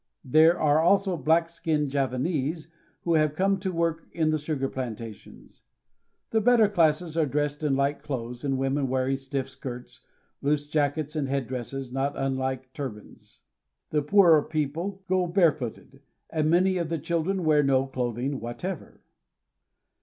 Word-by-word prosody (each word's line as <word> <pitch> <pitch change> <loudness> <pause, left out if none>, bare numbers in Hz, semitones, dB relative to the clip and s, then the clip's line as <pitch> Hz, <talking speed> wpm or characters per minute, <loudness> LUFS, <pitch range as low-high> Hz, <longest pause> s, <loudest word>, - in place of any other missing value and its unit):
There 160 +6 +5
are 150 0 +3
also 195 +2 +3
black 160 +3 +2
skinned 155 -4 -1
Javanese 140 +4 -1 0.3
who 170 - +1
have 155 -2 +2
come 195 +2 +2
to 190 0 -2
work 165 -1 -1
in 160 -2 +1
the 155 - 0
sugar 150 -3 -2
plantations. 115 -5 -8 0.7
The 220 - +2
better 230 -1 +5
classes 165 -3 +1
are 160 -2 +2
dressed 145 +2 -2
in 145 -3 +2
light 140 +1 0
clothes, 125 -3 -5
the 140 -2 -1
women 135 +1 0
wearing 130 +1 0
stiff 135 0 -4
skirts, 130 -2 -9 0.4
loose 145 +1 +1
jackets, 150 0 -1
and 145 -3 -1
head 135 -1 -1
dresses 130 +1 -5
not 135 +2 0
unlike 130 -1 -2
turbans. 125 -8 -9 0.5
The 150 - +2
poorer 165 0 +6
people 160 +7 -3
go 185 -1 +1
barefooted, 150 - 0 0.3
and 155 -1 +1
many 185 +3 +3
of 170 -2 -2
the 165 - -1
children 170 +4 -1
wear 150 -1 +5
no 135 -2 +2
clothing 130 +1 -2
whatever. 150 +9 -6
150 Hz, 150 wpm, -26 LUFS, 135-165 Hz, 0.7 s, poorer